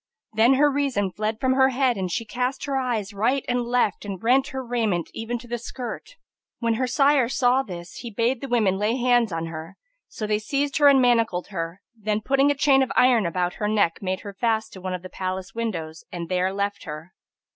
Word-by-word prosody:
Then 230 +5 +5
her 290 +2 +4
reason 270 -9 0
fled 215 +3 -3
from 260 -1 +2
her 265 0 +4
head 260 -1 +1
and 185 -3 -3
she 230 -1 -2
cast 250 +4 -2
her 280 -1 -2
eyes 235 -6 -1
right 245 +7 0
and 245 0 +1
left 240 -3 0
and 200 -2 -5
rent 260 +4 +3
her 265 -2 -5
raiment 220 -8 -1
even 225 +2 -3
to 240 +1 -12
the 240 0 -3
skirt. 250 - -7 0.4
When 230 -1 0
her 255 +3 0
sire 275 -2 +3
saw 255 0 +3
this, 175 -7 -9
he 240 - -6
bade 230 +3 0
the 275 - -4
women 215 -6 +2
lay 215 +3 +1
hands 245 -3 +3
on 165 0 -2
her; 165 +3 -8 0.3
so 215 - -5
they 210 0 +1
seized 280 +5 -1
her 295 -2 +6
and 275 -1 +7
manacled 230 -7 +2
her, 170 -1 -5
then 215 -1 -1
putting 275 +4 +3
a 285 - +2
chain 275 -1 +4
of 265 - 0
iron 240 -7 +4
about 180 +1 -1
her 210 - +1
neck, 205 -6 +1
made 185 0 -2
her 200 - -8
fast 220 +1 -1
to 185 - -10
one 185 0 -3
of 180 - -8
the - - -6
palace 185 0 -5
windows 170 -9 -4
and 170 -2 -6
there 185 0 +1
left 200 +1 -3
her. 155 +3 -8
225 Hz, 220 wpm, -24 LUFS, 190-255 Hz, 0.4 s, and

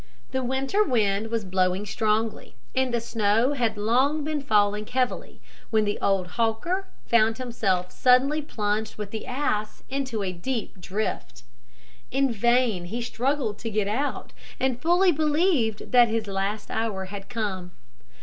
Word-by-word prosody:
The 260 - 0
winter 270 +11 +1
wind 220 - +1
was 225 -2 -2
blowing 185 +1 +1
strongly, 215 +1 -1 0.2
and 255 -2 +1
snow 225 +3 +2
had 230 -5 0
long 260 +8 +2
been 300 -1 -2
falling 210 -4 +2
heavily, 255 -1 -2 0.3
when 220 -1 +2
the 205 - -1
old 195 -2 +2 0.2
hawker 340 - 0 0.2
found 225 -1 +3
himself 195 -8 -1
suddenly 265 +4 +4
plunged 215 -5 -2
with 210 -1 -6
the 220 - -5
ass 250 -5 -2
into 260 -6 -2
a 185 -1 -2
deep 210 0 -4
drift. 185 - -4 0.7
In 270 0 +1
vain 235 -4 +2
he 230 +7 -4
struggled 250 -2 -1
to 225 - -4
get 210 -2 0
out, 260 +8 -2 0.3
and 255 -2 0
fully 355 +3 +4
believed 300 - +1
that 245 -1 +7
his 225 -1 -1
last 200 +1 -3
hour 210 -4 -1
had 195 +1 -8
come. 200 -7 -3
225 Hz, 145 wpm, -26 LUFS, 205-260 Hz, 0.7 s, that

